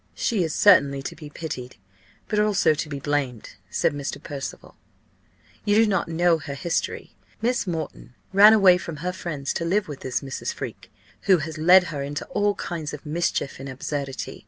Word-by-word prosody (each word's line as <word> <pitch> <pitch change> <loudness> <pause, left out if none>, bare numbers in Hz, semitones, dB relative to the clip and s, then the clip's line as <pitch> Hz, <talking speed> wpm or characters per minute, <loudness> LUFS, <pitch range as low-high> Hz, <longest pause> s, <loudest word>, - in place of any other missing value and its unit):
"She 210 -6 0
is 160 - -2
certainly 140 -8 +5
to - - -5
be 150 -2 -10
pitied, 135 -5 -6 0.5
but 210 - 0
also 210 -6 +3
to 155 0 -4
be 140 -1 -4
blamed," 140 -5 -2 0.2
said - - +1
Mr. 145 -1 -4
Percival. 140 -2 -7 0.9
"You 205 -1 +2
do 225 +1 +6
not 195 -5 0
know 165 0 +2
her 140 -2 -6
history. 170 +4 -3 0.2
Miss 240 -2 0
Moreton 160 -7 -5 0.2
ran 205 +3 +9
away 190 -4 +6
from 165 -2 -6
her 180 - -1
friends 150 -6 -4
to - - -2
live 190 +5 +1
with 145 -3 -7
this 130 -1 -2
Mrs. 135 -2 -4
Freke, - - -7 0.4
who 190 -2 +7
has 155 0 -5
led 180 +3 +7
her 140 - -3
into 145 +1 -4
all 205 -5 +1
kinds 160 -4 -4
of 150 - -14
mischief 155 -3 -1
and 135 +1 -7
absurdity. 135 0 -5
160 Hz, 180 wpm, -24 LUFS, 140-185 Hz, 0.9 s, ran